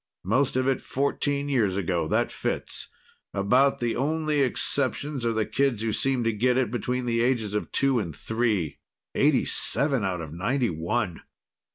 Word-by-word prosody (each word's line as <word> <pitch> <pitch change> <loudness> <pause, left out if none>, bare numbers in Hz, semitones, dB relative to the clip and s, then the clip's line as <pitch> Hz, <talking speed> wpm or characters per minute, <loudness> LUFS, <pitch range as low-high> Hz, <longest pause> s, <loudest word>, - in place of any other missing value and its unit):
"Most 125 +9 +1
of 130 0 +1
it 135 -2 +1
fourteen 140 +1 -1
years 110 -9 +1
ago. 85 -4 0
That - - +1
fits. - - -3 0.5
About 125 +8 +3
the 120 -1 -1
only 155 +2 0
exceptions 140 +1 0
are - - +2
the 110 -1 0
kids 135 -6 0
who 110 -1 0
seem 135 0 +1
to 115 0 +1
get 125 +4 +2
it 130 -4 +1
between 125 +1 -2
the 115 -1 +1
ages 120 -4 0
of 105 - -2
two 135 -3 +2
and 85 -8 -4
three. 110 -7 -1 0.3
Eighty - - +3
seven 135 -1 +1
out 95 -2 -1
of 80 -2 -7
ninety 115 +7 0
one!" 85 +3 -2
120 Hz, 170 wpm, -26 LUFS, 105-135 Hz, 0.5 s, About